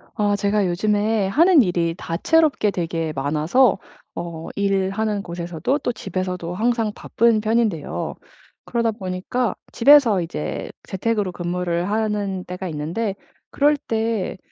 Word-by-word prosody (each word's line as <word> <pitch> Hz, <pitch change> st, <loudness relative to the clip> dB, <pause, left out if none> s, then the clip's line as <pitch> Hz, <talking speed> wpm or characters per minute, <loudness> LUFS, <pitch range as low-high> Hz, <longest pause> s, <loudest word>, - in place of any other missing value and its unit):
아 205 Hz, -2 st, +1 dB
제가 200 Hz, -1 st, +1 dB
요즘에 210 Hz, +3 st, +1 dB
하는 320 Hz, -, +5 dB
일이 170 Hz, -4 st, 0 dB
다채롭게 275 Hz, -, +2 dB
되게 165 Hz, -3 st, -2 dB
많아서 155 Hz, -, +2 dB, 0.4 s
어 170 Hz, -1 st, -6 dB
일하는 200 Hz, +1 st, 0 dB
곳에서도 170 Hz, -, -2 dB
또 245 Hz, -, -1 dB
집에서도 180 Hz, -4 st, -4 dB
항상 225 Hz, +2 st, 0 dB
바쁜 230 Hz, -1 st, +2 dB
편인데요. 215 Hz, -7 st, -1 dB, 0.5 s
그러다 235 Hz, -1 st, 0 dB
보니까 200 Hz, +4 st, -2 dB, 0.2 s
집에서 240 Hz, -7 st, +6 dB
이제 160 Hz, -3 st, -4 dB
재택으로 205 Hz, 0 st, -1 dB
근무를 175 Hz, 0 st, -2 dB
하는 205 Hz, -3 st, -1 dB
때가 180 Hz, +1 st, -6 dB
있는데 170 Hz, +8 st, -3 dB, 0.4 s
그럴 295 Hz, +1 st, +3 dB
때 225 Hz, -7 st, -2 dB
200 Hz, 280 characters per minute, -22 LUFS, 175-225 Hz, 0.5 s, 집에서